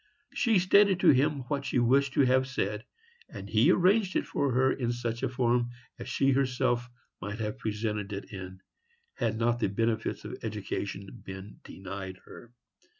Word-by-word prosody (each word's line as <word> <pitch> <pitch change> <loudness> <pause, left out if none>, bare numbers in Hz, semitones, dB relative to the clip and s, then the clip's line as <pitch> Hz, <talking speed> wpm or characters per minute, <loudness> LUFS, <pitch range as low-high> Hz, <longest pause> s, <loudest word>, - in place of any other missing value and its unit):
She 230 -5 +3
stated 190 +1 +5
to - - +6
him 140 +1 +2
what 140 +2 -3
she 135 - -1
wished 135 +3 +3
to - - +3
have 130 0 +3
said, 105 -3 -2 0.4
and - - -8
he - - +4
arranged 190 +2 +3
it - - +1
for 140 -2 -1
her 130 +2 +3
in 120 -3 -1
such 120 -1 -3
a - - 0
form 120 -1 +1 0.3
as - - -7
she 135 0 +2
herself 125 -2 +1 0.3
might 105 +1 -5
have 110 +3 -4
presented 105 -2 -3
it 100 +1 -7
in, 95 -1 -8 0.5
had - - -1
not 120 +1 +1
the 115 - +1
benefits 115 +2 -1
of - - -7
education 100 -2 -5
been 95 +1 -9
denied 95 -1 -7
her. 120 - -13
120 Hz, 170 wpm, -29 LUFS, 105-135 Hz, 0.5 s, to